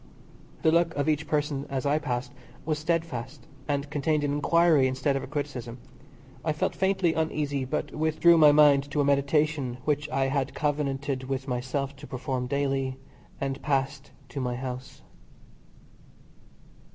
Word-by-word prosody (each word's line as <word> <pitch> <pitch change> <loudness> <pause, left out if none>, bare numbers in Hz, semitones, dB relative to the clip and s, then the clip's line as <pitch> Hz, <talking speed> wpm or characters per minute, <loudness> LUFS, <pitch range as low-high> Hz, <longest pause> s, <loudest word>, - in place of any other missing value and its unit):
The 160 - +5
look 170 0 +2
of 145 +1 -1
each 150 0 +1
person 145 -2 -1
as 135 -1 -2
I 145 +2 +2
passed 130 -3 -3 0.3
was 155 -1 -1
steadfast, 150 -6 -3 0.2
and 145 -1 -1
contained 150 +1 +1
an 145 -1 0
enquiry 155 -1 +4
instead 130 +2 0
of 135 - -1
a 135 - -7
criticism. 130 -4 -4 0.7
I 155 - 0
felt 150 - -1
faintly 190 -3 +1
uneasy, 150 -4 -1
but 130 - -3
withdrew 160 +2 +4
my 150 -1 +8
mind 145 -1 +5
to 145 0 0
a - - +2
meditation 140 -2 +1
which 150 0 0
I 135 0 +1
had 135 0 -1
covenanted 140 -2 -1
with 135 +1 -3
myself 130 +2 -2
to - - -11
perform 130 -1 -3
daily, 135 -1 -1 0.4
and 135 0 -3
passed 135 0 -1 0.2
to 140 +2 -4
my 125 -1 -1
house. 130 0 -7
140 Hz, 150 wpm, -27 LUFS, 135-150 Hz, 0.7 s, my